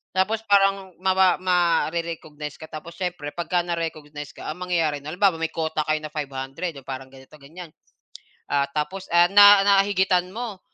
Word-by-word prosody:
Tapos 215 +4 +1
parang 195 -2 +2
mawa 190 -1 +3
mare-recognize 165 -4 -1
ka 160 - -9
tapos 165 +2 -9
siyempre 175 -5 -4
'pagka 175 0 -1
na-recognize 155 -4 -5
ka - - -7
ang 170 - -9
mangyayari 165 -5 0
nun 150 +3 -8
halimbawa, 190 -3 +3
may 165 - -1
quota 160 -1 -2
kayo 155 0 +1
na 155 - -5
500 140 +3 -5
'yong 135 -1 -13
parang 130 0 -6
ganito, 135 +2 -16
ganyan. 165 +3 -11 0.8
Ah, 140 -1 +2
tapos, 155 +6 -4
ah, 175 0 +5
na 205 0 +9
na 195 -1 +6
higitan 185 -2 +1
mo. 225 -4 -6
170 Hz, 170 wpm, -23 LUFS, 150-185 Hz, 0.8 s, na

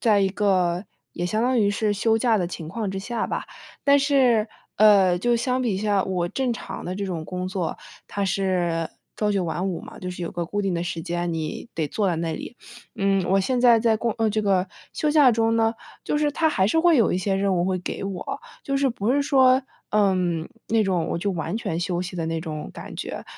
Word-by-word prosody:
在 215 -4 +4
一 195 - +3
个 185 -2 +1 0.3
也 175 - -3
相 215 +5 0
当 250 +1 +2
于 205 -2 +3
是 210 0 0
休 220 +2 +2
假 225 -1 +2
的 175 - 0
情 165 -2 -7
况 210 +2 -3
之 195 - -4
下 235 +3 -2
吧， - - -3 0.4
但 285 0 +5
是， 260 -6 +3 0.3
呃， 195 -4 +6
就 240 +5 +2
相 250 +2 0
比 225 -6 0
下 205 -1 +1
我 180 -2 -1
正 255 +4 -1
常 195 -4 -7
的 180 - -3
这 200 +1 -3
种 170 -4 -4
工 180 +2 -4
作， 185 -3 -3 0.3
它 200 - -2
是 180 -4 0 0.3
朝 210 -1 +1
九 195 -3 0
晚 175 +3 -2
五 170 -2 -3
嘛， - - -11
就 180 - -4
是 180 0 -6
有 170 - -3
个 175 -1 -2
固 205 +5 -2
定 195 -3 -1
的 170 - -1
时 170 -2 -3
间， 175 +1 -2
你 160 +8 -4
得 160 -2 -1
坐 200 +6 0
在 170 - 0
那 165 -1 -2
里。 245 - -8 0.4
嗯， 195 -1 +2
我 195 - +4
现 245 +6 0
在 240 -2 +6
在 225 -1 +2
过 230 +1 -1
呃， 225 - +2
这 215 +1 0
个 195 -2 +2 0.3
休 305 - -1
假 295 -4 +6
中 225 0 +2
呢， 225 0 +2 0.3
就 295 - -1
是 295 -1 +1
它 320 +2 +2
还 190 -10 +2
是 320 +10 +2
会 340 -2 +5
有 230 -6 +3
一 - - +1
些 195 +1 0
任 195 0 +1
务 175 - +1
会 185 0 0
给 180 - -5
我， 195 - -4 0.2
就 275 0 -1
是 275 -1 +2
不 230 +2 0
是 285 0 +2
说， 265 -2 +4 0.3
嗯， 185 -5 +1 0.2
那 225 0 +2
种 185 -5 0
我 - - -1
就 200 +4 -1
完 170 +3 -3
全 170 -8 -3
休 175 0 -1
息 180 0 -6
的 165 -1 -2
那 165 0 -2
种 155 -2 -5
感 - - -9
觉。 - - -5
195 Hz, 255 characters per minute, -24 LUFS, 180-230 Hz, 0.4 s, 呃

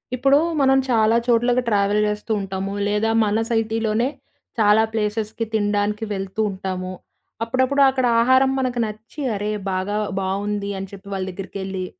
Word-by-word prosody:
ఇప్పుడు 275 +3 +4 0.2
మనం 270 0 +4
చాలా 225 -2 +3
చోట్లకు 240 +1 +3
ట్రావెల్ 205 0 +2
జేస్తూ 210 +2 -4
ఉంటాము. 195 0 -4
లేదా 210 +2 +1 0.2
మన 210 +1 +1
సైటీలోనే 225 0 0 0.5
చాలా 210 0 +5
ప్లేసెస్‌కి 220 +1 -2
తినడానికి 205 0 0
వెళ్తూ 195 +2 -3
ఉంటాము. 185 -1 -4 0.5
అప్పుడప్పుడు 260 +4 +1
అక్కడ 260 -1 0
ఆహారం 260 +2 +4
మనకి 250 -2 -1
నచ్చి 215 +7 -8
అరే! 205 +1 -2 0.2
బాగా 190 +2 -2 0.2
బావుంది 200 +1 -2
అని 195 - -5
చెప్పి 200 0 -12
వాళ్ళ 190 -1 -2
దగ్గరికెళ్ళి. 190 0 -5
210 Hz, 135 wpm, -22 LUFS, 200-230 Hz, 0.5 s, చాలా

